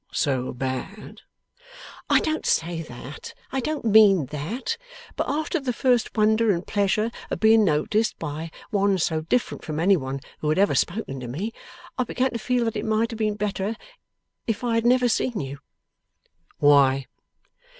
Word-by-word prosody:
So 130 -3 0
bad?' 130 - -5 0.9
'I - - +6
don't 315 0 -2
say 165 0 0
that. 135 -1 -9 0.2
I 270 - -1
don't 295 +1 -3
mean 205 -7 +6
that. 210 - -3 0.4
But - - -2
after 310 +4 -1
the 265 -3 -2
first 245 -2 +1
wonder 220 +1 +3
and 175 -1 -2
pleasure 210 +2 +1 0.2
of - - -3
being 220 0 +6
noticed 195 +7 +1
by 160 +1 -5 0.2
one 200 -2 +2
so 160 -2 0
different 240 +10 -1
from 155 -1 -4
any 190 +4 +5
one 135 -4 -3 0.2
who 150 - -1
had 155 - +1
ever 200 +1 +3
spoken 175 -8 -1
to 125 - -6
me, 185 - -4 0.5
I - - +4
began 255 +2 -1
to 235 - -4
feel 250 0 0
that 225 - -2
it 210 - -3
might 220 +1 +1
have 225 - -7
been 215 -1 0
better 210 +1 -2 0.7
if 225 +1 -2
I 240 -1 0
had 230 +1 +2
never 250 0 +4
seen 235 -1 0
you.' 140 0 -6 1.0
'Why? 135 -2 +4
205 Hz, 170 wpm, -24 LUFS, 155-230 Hz, 1.0 s, I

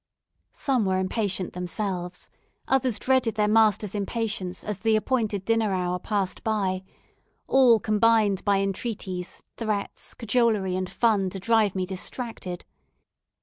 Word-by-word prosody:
Some 260 -7 +1
were 190 -1 +1
impatient 190 0 -1
themselves, 180 0 -4 0.4
others 255 -4 +2
dreaded 255 -4 +1
their 210 -1 +2
masters' 210 -2 +3
impatience 205 -3 -3
as 210 -2 -4
the 220 +3 +2
appointed 215 -3 0
dinner 225 -2 +2
hour 180 -1 -1
passed 195 -1 -2
by 195 -4 0 0.6
all 250 -4 +5
combined 215 -1 +2
by 200 -1 +2
entreaties, 195 -3 -4
threats, 215 -3 -3
cajolery, 220 -5 +1
and 185 0 -2
fun 210 -5 +2
to 195 - -6
drive 215 -1 +2
me 185 -1 0
distracted. 190 -1 -5
205 Hz, 125 wpm, -26 LUFS, 185-225 Hz, 0.6 s, all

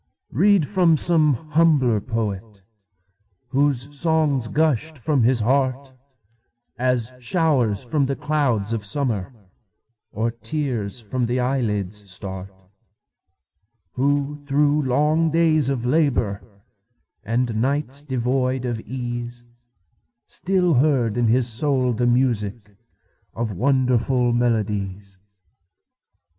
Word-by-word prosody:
Read 190 - +3
from 180 -5 +3
some 155 -3 +4 0.2
humbler 145 -9 +3
poet, 105 -3 -4 0.9
Whose 140 0 0
songs 150 -5 +1
gushed 155 +2 0
from 140 +2 0
his 120 0 +3
heart, 130 +2 0 0.9
As 125 -2 0
showers 125 - +1
from 135 +2 0
the 140 - -1
clouds 125 -10 0
of 110 -2 -3
summer, 110 -2 -2 0.8
Or 115 +2 -1
tears 125 -4 -3
from 120 +2 -2
the 125 +2 -1
eyelids 105 -6 -2
start; 95 0 -6 1.4
Who, 145 +4 -1
through 145 +1 +2
long 150 +5 +2
days 155 -3 +2
of 125 -3 -2
labor, 125 -8 +1 0.8
And 115 -1 -1
nights 140 +1 -1
devoid 130 -1 -1
of 120 -2 -2
ease, 120 0 -6 0.8
Still 180 -2 0
heard 125 -5 +2
in 120 -1 +1
his 120 +2 +2
soul 125 +1 +1
the 120 +2 0
musicOf 115 -2 -3
wonderful 125 +1 +1
melodies. 105 -5 -2
125 Hz, 100 wpm, -22 LUFS, 115-145 Hz, 1.4 s, some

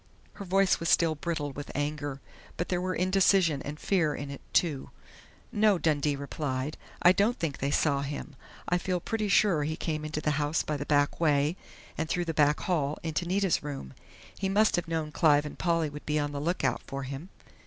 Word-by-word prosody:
Her 200 - -8
voice 195 +1 +3
was 165 - -1
still 165 -2 +4
brittle 155 -2 -3
with 145 +2 -8
anger, 145 -1 -3 0.4
but 175 - -2
there 180 -1 0
were 185 0 -1
indecision 185 -4 +3
and 150 +1 -6
fear 165 -7 +1
in 140 0 -6
it, 140 - -8
too. 150 -6 +1 0.6
"No," 210 -3 +4
Dundee 150 -3 +1
replied. 140 0 -3 0.3
"I 175 - +8
don't 205 +6 +2
think 155 -5 -3
they 140 - 0
saw 140 -1 +2
him. 140 0 -5 0.3
I 180 - +2
feel 180 0 -1
pretty 215 +4 -2
sure 195 -6 +3
he 155 +2 -2
came 155 -3 -3
into 155 0 -3
the 150 - 0
house 145 +2 +1
by 150 - -2
the 145 0 -5
back 145 -1 +2
way, 150 0 +2 0.4
and 160 0 -1
through 175 0 0
the 165 - -2
back 150 -1 +3
hall 150 -5 0
into 165 +2 -2
Nita's 190 0 +1
room. 140 - -6 0.5
He 195 - 0
must 215 +3 +3
have 175 - -2
known 160 -2 -2
Clive 150 -1 +4
and 150 - -8
Polly 165 -2 +1
would 150 +1 -10
be 150 0 +1
on 145 -1 -1
the 140 -1 -4
lookout 175 +4 0
for 135 0 -4
him.... 135 +7 -6
155 Hz, 205 wpm, -29 LUFS, 145-180 Hz, 0.6 s, I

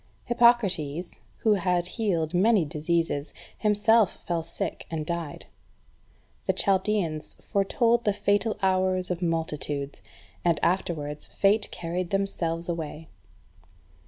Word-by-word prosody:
3. - - -25
Hippocrates, 190 -10 +2 0.2
who 220 - +4
had 180 -3 +1
healed 175 -8 -1
many 195 0 +4
diseases, 155 0 -1 0.2
himself 210 0 +3
fell 170 -1 0
sick, 160 - -5
and 155 -2 -3
died. 170 -3 -4 1.0
The - - +3
Chaldeans 190 -6 0
foretold 230 +4 +1
the 210 - +3
fatal 205 +2 +1
hours 185 -1 +1
of 180 0 -3
multitudes, 150 -4 -2 0.4
and 170 -2 +2
afterwards 155 -5 -1
fate 205 +2 +2
carried 175 +1 -3
themselves 170 -4 -1
away. 160 -2 -5
180 Hz, 110 wpm, -27 LUFS, 165-205 Hz, 1.0 s, who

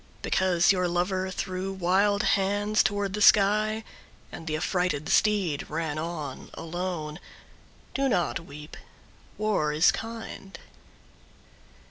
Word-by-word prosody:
Because 185 -1 +3
your 180 -2 +1
lover 185 +2 -1
threw 185 +1 -3
wild 195 +3 +2
hands 205 +2 +2
toward 205 -1 -1
the 210 - -3
sky 215 +2 +4 0.5
And 165 - -9
the 155 -1 -1
affrighted 180 -3 -1
steed 195 -9 +2
ran 155 -1 -2
on 155 -4 -5
alone, 165 -2 -4 0.7
Do 275 0 +1
not 175 -8 0
weep. 150 -1 -11 0.6
War 210 -8 +1
is 155 +3 +5
kind. 225 -3 -7
185 Hz, 110 wpm, -27 LUFS, 165-205 Hz, 0.7 s, is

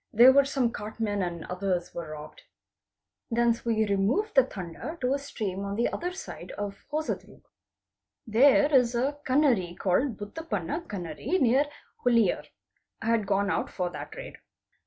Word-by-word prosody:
'There 260 +5 +7
some 270 -3 0
cartmen 210 -1 -3
and 170 -3 -3
others 180 -1 -2
were 170 -2 -6
robbed. 150 0 -9 0.9
Thence 235 -1 +2
we 220 -2 +2
removed 210 - +1
the 265 - +7
Tanda 195 - -7
to 255 +1 +1
a 280 - 0
stream 200 -8 -4
on 200 0 -3
the 235 - +1
other 355 +1 -2
side 370 - -8
of 205 -1 -6
Hosadrug. 310 +1 -4 0.8
There 275 +6 +5
is 250 -3 +4
a 275 +4 0
Kanave 255 - +2
called 215 +6 +1
Bhutapanna 210 - -4
Kanave 180 - -2
near 265 +2 +4 0.4
Huliyar. 230 -6 +3 0.6
I - - -5
had 225 -3 +2
gone 200 +1 +1
out - - -1
for 180 -2 -3
that - - -8
raid. - - -9
230 Hz, 150 wpm, -28 LUFS, 195-275 Hz, 0.9 s, There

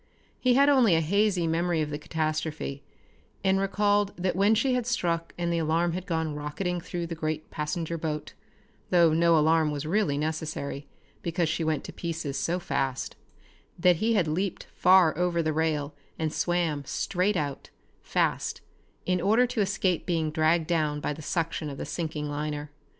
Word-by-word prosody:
He 250 -1 +3
had 280 +2 +5
only 255 -10 +5
a - - +4
hazy 190 +2 +2
memory 165 +1 +1
of 150 -1 -1
the 145 - -3
catastrophe, 155 -2 -3 0.6
and 190 0 +3
recalled 205 +1 +1
that 180 +1 -1
when 200 +3 +4
she 255 +4 +2
had 250 -2 -1
struck 170 -8 -1
and 170 -1 -1
the 170 - +1
alarm 165 +2 +1
had 185 +2 -5
gone 160 -3 -1
rocketing 170 +5 -3
through 175 0 -4
the 165 - -5
great 155 -1 -4
passenger 160 +2 -3
boat 150 -1 -4 0.6
though 170 -3 +5
no 170 0 +4
alarm 160 0 +3
was 145 0 -3
really 165 -4 +1
necessary 155 -2 -3 0.3
because 170 -1 0
she 160 +1 -1
went 155 -2 0
to - - -8
pieces 160 -5 -4
so 175 +4 0
fast 135 -6 -2 0.6
that 175 0 +4
he 225 +5 +1
had 180 -6 +2
leaped 180 +5 -2
far 180 -3 +5
over 170 0 +1
the 155 0 0
rail 150 -2 0 0.2
and 160 -1 -2
swam 170 -5 0
straight 185 +7 0
out, 145 -3 -3 0.3
fast, - - -1 0.4
in 180 -1 +1
order 220 +7 +4
to 250 -3 -1
escape 190 -3 0
being 165 -3 0
dragged 160 +1 +2
down 155 -3 0
by 150 - -2
the 155 - -9
suction 160 0 -2
of 140 - -7
the - - -4
sinking 155 -3 -3
liner. 150 0 -4
165 Hz, 175 wpm, -27 LUFS, 155-180 Hz, 0.6 s, had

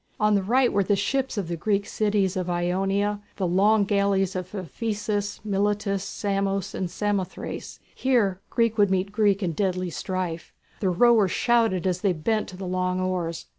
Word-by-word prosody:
On 210 0 +3
the 200 - +3
right 245 +6 +2
were 200 0 +3
the 205 +2 +2
ships 265 +5 -1
of 195 -4 -2
the 170 - -2
Greek 200 +4 0
cities 205 -3 0
of 180 -1 -2
Ionia, 195 +4 0
the 190 - -1
long 200 +4 +4
galleys 200 -2 +1
of 185 +2 -5
Ephesus, 205 - -3
Miletus, 200 -1 0
Samos, 195 -1 -2
and 185 - -3
Samothrace. 200 0 -3
Here 215 -8 +1
Greek 230 -2 +1
would 205 -1 +5
meet 190 +1 0
Greek 205 -1 +2
in 175 - 0
deadly 185 0 -1
strife. 180 -2 -4 0.2
The 190 - +1
rowers 215 +1 +4
shouted 225 -5 +2
as 180 -1 0
they 195 -3 +2
bent 215 +7 -1
to 185 - -10
the 190 - -6
long 185 0 -1
oars. 175 -3 -2
195 Hz, 170 wpm, -25 LUFS, 185-210 Hz, 0.2 s, would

